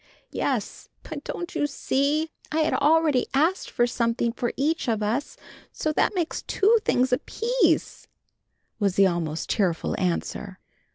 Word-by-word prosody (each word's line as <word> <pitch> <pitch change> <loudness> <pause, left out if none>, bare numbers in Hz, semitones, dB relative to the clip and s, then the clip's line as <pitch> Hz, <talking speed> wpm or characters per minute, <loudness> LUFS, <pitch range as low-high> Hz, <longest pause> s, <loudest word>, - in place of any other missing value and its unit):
"Yes, - - -2
but 295 -2 -7
don't 345 - -5
you 290 - 0
see, 290 +3 0 0.2
I 315 +1 +1
had 310 - +1
already 300 -3 +3
asked 325 +7 +1
for 240 - +2
something 235 -1 0
for 240 0 -2
each 310 +3 0
of 220 -2 0
us, 235 +7 -2 0.3
so 310 - -2
that 395 - +1
makes 340 -3 -1
two 420 +4 +3
things 250 +1 +2
apiece," 395 - 0 0.7
was 200 -3 +1
the 195 - +6
almost 170 -3 -1
tearful 180 -6 0
answer. 185 +2 -2
275 Hz, 145 wpm, -25 LUFS, 215-320 Hz, 0.7 s, the